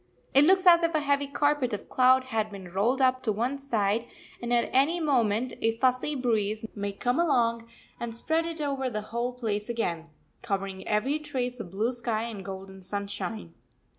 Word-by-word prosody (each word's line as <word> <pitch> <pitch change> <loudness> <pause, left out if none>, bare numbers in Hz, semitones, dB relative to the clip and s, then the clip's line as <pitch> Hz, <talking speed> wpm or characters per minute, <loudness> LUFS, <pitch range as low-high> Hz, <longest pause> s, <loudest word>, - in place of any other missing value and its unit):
It 275 +2 +7
looks 375 +2 +4
as 345 -1 +8
if 335 -1 +1
a - - +4
heavy 285 -1 +1
carpet 290 -3 +1
of 205 - -5
cloud 255 0 +4
had 225 -4 -1
been 190 -4 -9
rolled 240 +8 +2
up 255 0 +3
to 225 - 0
one 245 +7 -1
side, 230 -4 0 0.3
and 240 0 -4
at 240 -1 +2
any 290 +7 +3
moment 245 -6 +1
a 225 0 +1
fussy 255 +4 +1
breeze 220 -4 0
may 205 -1 -3
come 245 +8 -1
along 235 -8 +1 0.3
and 235 -1 -5
spread 325 +7 0
it 330 -2 -4
over 275 -3 -1
the 215 -3 -3
whole 240 +1 -1
place 215 -3 -3
again, 170 -8 -2 0.3
covering 195 -3 -3
every 255 +8 +1
trace 255 -5 -3
of 190 - -6
blue 210 +6 0
sky 235 -3 -2
and 220 -4 -6
golden 190 0 -8
sunshine. 200 -1 -5
235 Hz, 185 wpm, -28 LUFS, 210-270 Hz, 0.3 s, as